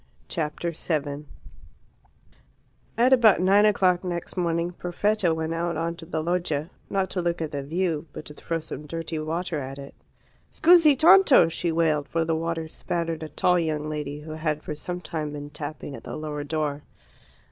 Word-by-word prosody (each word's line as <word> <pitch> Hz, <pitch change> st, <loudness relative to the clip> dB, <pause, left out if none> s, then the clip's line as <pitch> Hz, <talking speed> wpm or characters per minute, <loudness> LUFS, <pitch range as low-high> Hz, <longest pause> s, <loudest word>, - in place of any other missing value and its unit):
Chapter 165 Hz, +1 st, -3 dB
7 150 Hz, -2 st, -2 dB, 1.7 s
At 250 Hz, +3 st, +5 dB
about 230 Hz, -7 st, +6 dB
nine 195 Hz, +3 st, +5 dB
o'clock 185 Hz, -4 st, +3 dB
next 175 Hz, -2 st, -4 dB
morning 170 Hz, -1 st, 0 dB
Perfetta 180 Hz, +2 st, 0 dB
went 160 Hz, 0 st, -2 dB
out 170 Hz, +1 st, -2 dB
on 165 Hz, +1 st, -1 dB
to 165 Hz, -, -11 dB
the 160 Hz, -2 st, -2 dB
loggia, 170 Hz, -3 st, -1 dB, 0.2 s
not 190 Hz, -1 st, -1 dB
to 180 Hz, -, -1 dB
look 170 Hz, 0 st, -1 dB
at 160 Hz, -2 st, -3 dB
the 145 Hz, -, -3 dB
view, 165 Hz, +1 st, -2 dB
but 150 Hz, -, -9 dB
to 150 Hz, -, -9 dB
throw 165 Hz, +2 st, -3 dB
some 155 Hz, -1 st, -8 dB
dirty 165 Hz, 0 st, -4 dB
water 160 Hz, +1 st, -2 dB
at 135 Hz, 0 st, -6 dB
it. 140 Hz, 0 st, -9 dB, 0.6 s
"Scusi 330 Hz, -4 st, +6 dB
tanto!" 310 Hz, -, +7 dB
she 165 Hz, +1 st, -2 dB
wailed, 155 Hz, -3 st, +1 dB
for 165 Hz, 0 st, 0 dB
the 165 Hz, 0 st, 0 dB
water 165 Hz, 0 st, -2 dB
spattered 165 Hz, 0 st, -3 dB
a 155 Hz, -, -6 dB
tall 180 Hz, +3 st, +2 dB
young 155 Hz, -2 st, -1 dB
lady 150 Hz, -1 st, -4 dB
who 155 Hz, +1 st, -9 dB
had 155 Hz, -1 st, -2 dB
for 155 Hz, -, -4 dB
some 175 Hz, +4 st, -5 dB
time 155 Hz, -2 st, -4 dB
been 145 Hz, 0 st, -7 dB
tapping 145 Hz, -1 st, -6 dB
at -, -, -11 dB
the -, -, -6 dB
lower 150 Hz, -1 st, -4 dB
door. 150 Hz, -1 st, -2 dB
165 Hz, 180 wpm, -25 LUFS, 150-175 Hz, 1.7 s, tanto